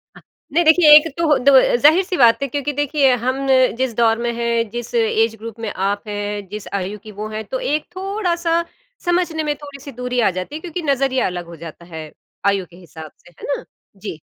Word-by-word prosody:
अ, - - -15 0.3
नहीं 345 - +3
देखिए 320 0 +6
एक 305 +2 +7
तो 310 -4 +3
दव 270 -1 +7 0.2
ज़ाहिर-सी 360 +5 +4
बात 235 -1 +5
है - - -1
क्योंकि 285 +2 -3
देखिए 285 -1 +2
हम 255 +1 0
न 265 - +6 0.2
जिस 260 -2 -1
दौर 225 -1 +3
में 235 0 -2
है, 235 0 +1
जिस 240 +2 -7
एज 225 0 +2
ग्रुप 225 +1 -9
में - - -2 0.2
आप 205 +2 -3
है, 205 0 -3
जिस 210 -1 -7
आयु 195 +3 -5
की 215 - -9
वो 215 - -3
हैं, 215 0 -5
तो 260 +5 -4
एक 300 0 0
थोड़ा-सा 355 -4 -1 0.4
समझने 345 -3 0
में 295 -1 -1
थोड़ी-सी 285 -1 -10
दूरी 250 0 -3
आ 220 - +4
जाती 185 +11 -6
है। 315 - -6
क्योंकि 350 0 -5
नज़रिया 270 -1 +1
अलग 180 -1 -5
हो 170 0 -11
जाता 165 +2 -11
है 155 -1 -7 0.4
आयु 195 -2 -2
के 170 - -17
हिसाब 160 -3 -11
से - - -15
है - - -8
ना? - - -10 0.3
जी। 190 -5 -7
250 Hz, 215 wpm, -19 LUFS, 215-300 Hz, 0.4 s, एक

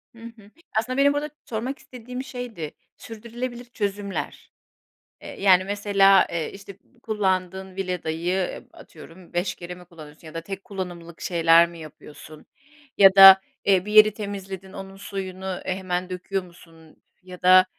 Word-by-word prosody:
Hı 230 - -16
hı. 225 -3 -13 0.3
Aslında 255 +4 -4
benim 280 +1 +4
burada 295 +1 -2 0.2
sormak 245 +5 -4
istediğim 250 +1 -8
şeydi. 235 - -7 0.3
Sürdürülebilir 240 +2 -7
çözümler. 205 -4 -5 0.7
Eee, - - -10
yani 185 -2 +5
mesela, 195 -1 +4
ııı, 165 -2 -2
işte 200 0 -11
b 245 - -30
kullandığın 190 -3 -2
Vileda'yı 180 -1 -2
ıp - - -23
atıyorum 170 +3 -15
5 175 +2 -1
kere 180 0 -8
mi 180 0 -15
kullanıyorsun 160 -2 -14
ya 155 - -11
da 165 - -5
tek 195 +3 -8
kullanımlık 175 -4 -8
şeyler 170 -1 +4
mi 170 - -12
yapıyorsun 155 0 -13 0.5
ya 195 -1 +7
da, 195 0 +11 0.3
ııı, 190 -1 +4
bir 210 - -5
yeri 215 -1 +7
temizledin 195 -2 -7
onun 195 0 -9
suyunu, 190 -1 -7
ııı, 185 -2 -4
hemen 185 -1 -3
döküyor 185 +1 -3
musun 165 -2 -18 0.2
ya 180 -1 -12
da, 185 0 +7
190 Hz, 150 wpm, -24 LUFS, 175-205 Hz, 0.7 s, da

